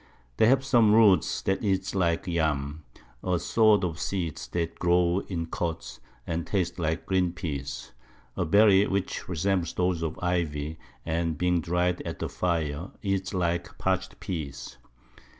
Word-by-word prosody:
They 110 - +5
have 135 +2 +3
some 115 -6 +5
Roots 105 -4 +4
that 95 +3 0
eat 95 -2 0
like 85 -3 +1
Yams, 80 -4 -1 0.4
a 90 -1 +1
sort 110 +2 +3
of 85 -2 -2
Seeds 85 -6 -3
that 85 -1 -3
grow 90 +1 +3
in 85 -3 -3
Cods, 80 -7 -4 0.3
and 85 0 -3
taste 90 -3 -1
like 80 -1 -1
green 90 -2 +1
Pease, 70 -7 -5 0.4
a - - 0
Berry 100 +2 +5
which 100 -1 -2
resembles 90 0 0
those 90 -2 0
of 80 -1 -3
Ivy, 80 -4 -2 0.3
and 80 -1 -1
being 90 +1 +1
dry'd 90 +2 0
at - - -5
the - - -3
Fire, 85 -1 -2
eats 95 -1 -1
like 85 -3 -2
parch'd 95 0 -1
Pease. 75 -7 -6
90 Hz, 150 wpm, -27 LUFS, 80-95 Hz, 0.4 s, They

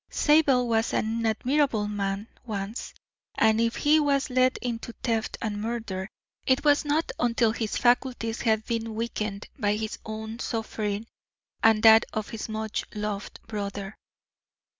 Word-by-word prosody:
Zabel 285 -5 +4
was 225 -1 +1
an 225 +1 0
admirable 240 -1 +1
man 200 0 -2 0.2
once, 210 -1 -5 0.4
and 220 0 +4
if 230 0 +1
he 305 +1 +4
was 280 -3 +1
led 255 0 +3
into 235 -1 -4
theft 225 -2 -1
and 205 -2 -2
murder, 215 -4 -3 0.4
it 260 +3 +2
was 290 -1 +5
not 300 +2 0
until 230 -2 +2
his 220 -2 -2
faculties 245 -2 +1
had 220 -2 +1
been 225 -1 -3
weakened 215 -3 -3
by 205 -2 +2
his 215 0 -4
own 220 +1 -6
suffering 220 -2 -3 0.6
and 220 -1 +4
that 220 0 +8
of 215 -1 -3
his 225 -1 -5
much 220 0 -3
loved 210 -1 -4
brother." 200 -2 -5
225 Hz, 140 wpm, -27 LUFS, 215-245 Hz, 0.6 s, that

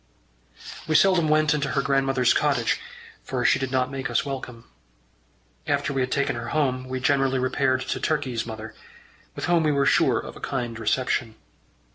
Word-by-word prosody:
We 155 - 0
seldom 185 -4 +4
went 155 0 +3
into 145 -2 -1
her 140 - +1
grandmother's 135 -2 +2
cottage, 140 -6 +1 0.4
for - - -3
she - - +4
did 135 -1 -2
not 130 0 0
make 135 -1 -4
us - - 0
welcome. 130 -4 -6 1.0
After - - 0
we 135 - 0
had 130 0 -2
taken 140 -2 0
her 120 0 -5
home 130 -3 -1
we 130 0 -3
generally 135 0 +2
repaired 130 0 +1
to 130 - -3
Turkey's 130 -7 -1
mother, 110 -1 -8 0.6
with - - -4
whom 175 -1 +3
we 155 -1 +2
were 140 -1 +2
sure - - +3
of - - -6
a - - -11
kind 120 -4 -3
reception. 115 0 -1
135 Hz, 175 wpm, -24 LUFS, 125-140 Hz, 1.0 s, seldom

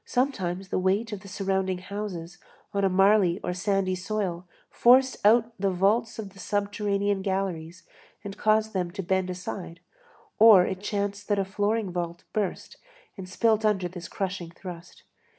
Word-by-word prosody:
Sometimes 195 -8 -1
the - - 0
weight 195 +5 +1
of 205 - -5
the 200 - -13
surrounding 190 -1 -1
houses 180 -3 -6 0.3
on 200 0 0
a 195 - +4
marly 195 -1 +4
or 180 - -2
sandy 190 0 0
soil 185 -2 -3 0.2
forced 260 +2 +4
out 225 +2 +4
the 195 0 +1
vaults 205 +5 +1
of 210 -3 -6
the 195 - -15
subterranean 205 0 -1
galleries 185 -3 -3 0.4
and 200 -2 -7
caused 215 0 +2
them 180 -2 -1
to 195 +2 -6
bend 185 +1 0
aside, 180 -1 -6 0.6
or 210 -5 +8
it 190 0 -4
chanced 205 -1 -3
that 205 - +1
a 195 - +1
flooring 205 +1 -1
vault 175 -1 -4
burst 205 -4 -3 0.4
and 190 -3 -8
split 220 +3 +2
under 200 -4 +1
this 175 -1 -8
crushing 190 -3 -4
thrust. 175 0 -11
195 Hz, 160 wpm, -26 LUFS, 185-210 Hz, 0.6 s, or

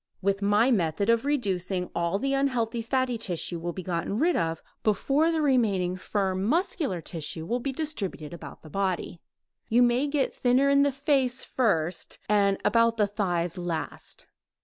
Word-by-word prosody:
With 200 +1 0
my 205 +5 +3
method 200 +1 +2
of 230 +2 +1
reducing 190 -10 -1
all 170 +1 0
of 200 - -2
the 275 0 +1
unhealthy 245 -4 0
fatty 250 0 0
tissue 175 -4 -3
will 175 +1 -3
be 185 +2 -7
gotten 175 +3 -2
rid 330 +7 +2
of 165 -1 -1 0.2
before 275 - +2
the 320 -2 0
remaining 205 -10 +2
firm 190 0 -1
muscular 290 - 0
tissue 160 0 -5
will 240 +7 -1
be 275 +3 -2
distributed 220 - -4
about 170 - -10
the 155 - -11
body. 190 -2 -2 0.5
You 240 +2 +5
may 245 +4 +2
get 280 -2 0
thinner 255 +3 +3
in 280 0 +5
the 285 0 +3
face 270 -2 +1
first, 175 -9 -1
and 200 -1 +3
about 230 0 +3
the 210 - +4
thighs 180 -4 -2
last. 170 -2 -5
210 Hz, 170 wpm, -27 LUFS, 180-260 Hz, 0.5 s, You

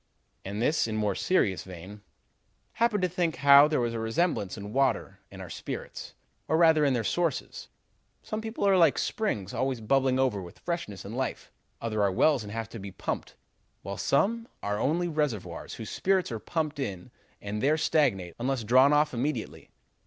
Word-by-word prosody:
And 100 +4 -3
this, 150 -2 +2
in 110 - -3
more 105 -2 +1
serious 100 - +1
vein: 95 +3 -10 0.7
'Happened 225 -4 +1
to - - +4
think 175 -2 -1
how 140 +1 +7
there 155 -2 0
was 120 -1 -1
a 115 - -3
resemblance 115 - -1
in 105 0 -7
water 135 0 0
and - - -9
our - - -9
spirits, - - -7 0.3
or 160 - +2
rather 160 -2 +5
in 140 -3 +3
their 115 - -1
sources. 170 +5 -2 0.6
Some 215 0 -4
people 220 -2 -2
are 195 - +5
like 170 -2 +5
springs, 105 - -2
always 130 -2 -1
bubbling 130 +3 +2
over 130 -7 +1
with 85 -2 -11
freshness 170 - -5
and 105 +4 -6
life; 130 +1 -3 0.3
others 110 -2 -3
are 100 -1 +3
wells 140 +7 +3
and 105 -1 -8
have 115 0 -4
to 115 - -8
be 100 0 -7
pumped; 95 - -5 0.5
while 100 +2 -5
some 230 +10 +1 0.2
are 105 0 -1
only 170 +5 +1
reservoirs 150 - -3
whose 110 - -7
spirits 190 -5 +1
are 115 - -3
pumped 155 +2 -3
in 95 -9 -5 0.3
and 105 +1 -4
there 150 +3 +3
stagnate 105 - +1
unless 130 0 -1
drawn 130 +6 +5
off 150 -1 +3
immediately. 135 +5 -3
130 Hz, 180 wpm, -28 LUFS, 105-160 Hz, 0.7 s, how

